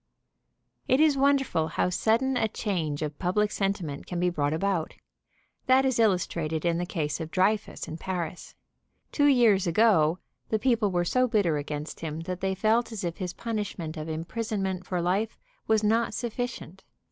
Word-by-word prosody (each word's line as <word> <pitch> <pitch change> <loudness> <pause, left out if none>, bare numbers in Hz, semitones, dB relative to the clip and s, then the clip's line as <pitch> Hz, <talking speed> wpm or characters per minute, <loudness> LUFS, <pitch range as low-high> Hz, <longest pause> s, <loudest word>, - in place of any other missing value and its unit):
It 260 - +3
is 310 -2 +5
wonderful 270 - +2
how 170 +2 0
sudden 230 +8 +1
a 225 - +2
change 165 -9 -2
of 150 -1 -5
public 205 +3 +1
sen 195 -1 +1
timent 155 -8 -7
can 175 - -3
be 180 0 +2
brought 145 -4 0
about. 170 0 -1 0.7
That 260 +1 +5
is 260 -3 +1
illustrated 170 -6 +1
in 170 0 +1
the 175 - -2
case 150 -5 -2
of 160 -1 -5
Dreyfus 200 +4 0
in 160 - -7
Paris. 180 -1 -5 0.6
Two 290 -1 +3
years 225 -9 +4
ago 170 -4 +4 0.3
the 220 - +2
peo 240 +1 +2
ple 210 -3 +1
were 175 -2 0
so 255 +7 +2
bitter 200 -10 +2
against 150 +1 -5
him 160 -1 -4
that 180 +1 -5
they 190 0 0
felt 220 +4 +2
as 220 -4 -5
if 170 -1 -3
his 180 -3 -4
punishment 205 -8 -4
of 155 0 -6
imprisonment 190 +2 -3
for 180 -2 -1
life 200 +5 0 0.3
was 220 -1 +3
not 225 +2 +2
suffi 240 0 -2
cient. 245 - -9
190 Hz, 180 wpm, -27 LUFS, 165-225 Hz, 0.7 s, is